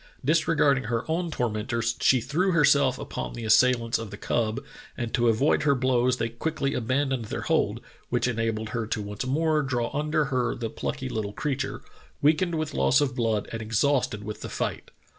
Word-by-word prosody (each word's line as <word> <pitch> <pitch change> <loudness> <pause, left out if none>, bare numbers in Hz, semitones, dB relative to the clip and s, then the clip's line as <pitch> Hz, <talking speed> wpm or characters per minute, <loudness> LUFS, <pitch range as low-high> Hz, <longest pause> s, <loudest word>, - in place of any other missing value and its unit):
Disregarding 150 -4 +3
her 115 +1 -1
own 170 +2 -1
tormentors, 115 -2 -1
she 130 -2 +4
threw 170 +10 0
herself 140 -4 +4
upon 60 -1 -5
the 115 - -6
assailants 115 +1 +3
of 115 -2 -6
the 100 - -8
cub, 110 +2 -1 0.4
and 120 -2 -4
to 120 -2 +2
avoid 115 +6 +3
her 140 -2 +3
blows 125 -1 +2
they 115 -1 -1
quickly 135 +4 -2
abandoned 130 0 0
their - - -4
hold, - - +1 0.3
which - - +1
enabled 115 -2 -1
her 115 0 -3
to 110 - -2
once 105 +4 -5
more 155 +3 +2
draw 125 -4 -1
under 150 +1 +1
her 125 -2 +1
the 115 -2 -4
plucky - - -4
little 105 +3 -3
creature, 140 0 -3 0.4
weakened 160 +4 +2
with 155 -2 -2
loss 70 0 +3
of 135 -3 0
blood 115 -4 0
and 115 - -4
exhausted 115 0 +1
with 105 0 -6
the - - -6
fight. - - -3
125 Hz, 180 wpm, -26 LUFS, 115-145 Hz, 0.4 s, she